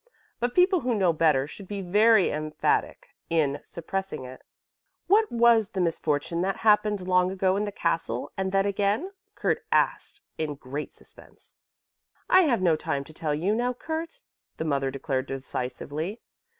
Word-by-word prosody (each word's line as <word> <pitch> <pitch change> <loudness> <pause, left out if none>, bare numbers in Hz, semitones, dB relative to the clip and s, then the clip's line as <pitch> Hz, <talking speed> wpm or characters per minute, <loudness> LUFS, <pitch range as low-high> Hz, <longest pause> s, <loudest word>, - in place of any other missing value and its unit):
But 245 +1 -1
people 365 0 +4
who 250 -5 -1
know 185 -5 +3
better 155 -4 +3
should 190 +6 -11
be 200 -1 -5
very 210 +2 +4
emphatic 155 0 -1 0.2
in 150 -4 +1
suppressing 170 -4 -5
it." 130 +1 -10 0.6
"What 425 +3 +3
was 230 -3 +4
the 190 - -5
misfortune 165 -1 -1
that 195 +2 -1
happened 210 -3 +3
long 180 0 +3
ago 190 0 +1
in 205 +1 0
the 205 - -4
castle 165 - -2
and 190 0 -2
then 195 0 +2
again?" 205 - 0 0.2
Kurt - - -1
asked 410 - 0 0.2
in 155 -2 -2
great 140 +2 -6
suspense. - - -18 0.8
"I 375 - +8
have 235 -10 +1
no 170 -3 +4
time 140 -2 -2
to 155 - -14
tell 155 -1 -2
you 180 +7 0
now, 245 +3 0
Kurt," 330 - -5 0.3
the 160 - -3
mother 140 -3 0
declared 135 0 -3
decisively. 140 - -5
185 Hz, 160 wpm, -26 LUFS, 150-215 Hz, 0.8 s, I